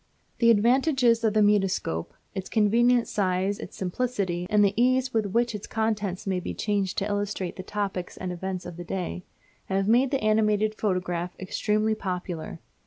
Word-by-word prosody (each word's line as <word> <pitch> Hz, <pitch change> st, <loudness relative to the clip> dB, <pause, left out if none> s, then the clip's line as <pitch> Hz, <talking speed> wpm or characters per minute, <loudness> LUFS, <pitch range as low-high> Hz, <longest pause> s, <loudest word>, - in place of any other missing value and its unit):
The 235 Hz, -, +5 dB
advantages 240 Hz, +1 st, +3 dB
of 220 Hz, -1 st, +2 dB
the 215 Hz, -, +5 dB
mutoscope 195 Hz, -, +1 dB, 0.2 s
its 190 Hz, -2 st, -5 dB
convenient 235 Hz, +3 st, +3 dB
size, 190 Hz, 0 st, 0 dB
its -, -, -9 dB
simplicity, 185 Hz, -3 st, -2 dB
and 210 Hz, -1 st, +5 dB
the 200 Hz, -, +2 dB
ease 255 Hz, +2 st, +2 dB
with 220 Hz, -2 st, +1 dB
which 235 Hz, +4 st, +1 dB
its 210 Hz, -1 st, -6 dB
contents 215 Hz, -3 st, -2 dB
may 190 Hz, -2 st, 0 dB
be -, -, -5 dB
changed 200 Hz, -3 st, -1 dB
to 195 Hz, -, 0 dB
illustrate 205 Hz, -3 st, -2 dB
the -, -, -6 dB
topics 195 Hz, -2 st, -4 dB
and 185 Hz, -1 st, -4 dB
events 185 Hz, +1 st, -4 dB
of 175 Hz, -1 st, -8 dB
the 175 Hz, -, -6 dB
day 180 Hz, 0 st, -4 dB, 0.4 s
have 195 Hz, 0 st, 0 dB
made 245 Hz, +4 st, +4 dB
the 275 Hz, -4 st, -1 dB
animated 215 Hz, 0 st, +2 dB
photograph 180 Hz, -4 st, -2 dB
extremely 215 Hz, +3 st, 0 dB
popular. 180 Hz, -5 st, -4 dB
205 Hz, 170 wpm, -26 LUFS, 185-225 Hz, 0.4 s, The